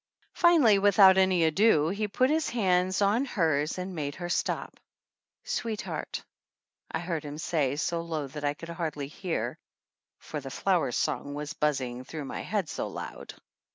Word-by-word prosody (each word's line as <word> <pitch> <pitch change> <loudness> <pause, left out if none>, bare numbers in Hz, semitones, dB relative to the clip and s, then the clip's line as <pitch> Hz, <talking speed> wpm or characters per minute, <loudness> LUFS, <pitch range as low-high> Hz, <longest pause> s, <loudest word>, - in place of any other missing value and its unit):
Finally, 300 - +5
with 200 0 +3
out 190 -2 +9
any 190 -2 +3
ado, 160 -1 +4
he 210 +3 -1
put 255 +6 +2
his 315 -2 +1
hands 185 -3 +2
on 210 +6 +3
hers 160 - 0
and 185 +1 -4
made 145 -3 -3
her 175 -1 -5
stop. - - -2 0.6
"Sweetheart," 220 -3 -4 0.7
I - - -2
heard 170 -2 -3
him 145 0 -7
say, 150 -4 0
so 170 +2 -1
low 160 -3 -3
that 145 +2 -8
I 145 0 0
could 165 +2 -10
hardly 160 -4 -3
hear, 170 +4 -3 0.6
for - - -6
The - - -7
Flower - - +1
Song 145 0 -1
was 150 0 -5
buzzing 130 -4 -1
through 150 +2 -6
my - - -5
head 200 -4 -1
so - - -3
loud. - - -8
170 Hz, 165 wpm, -28 LUFS, 150-200 Hz, 0.7 s, out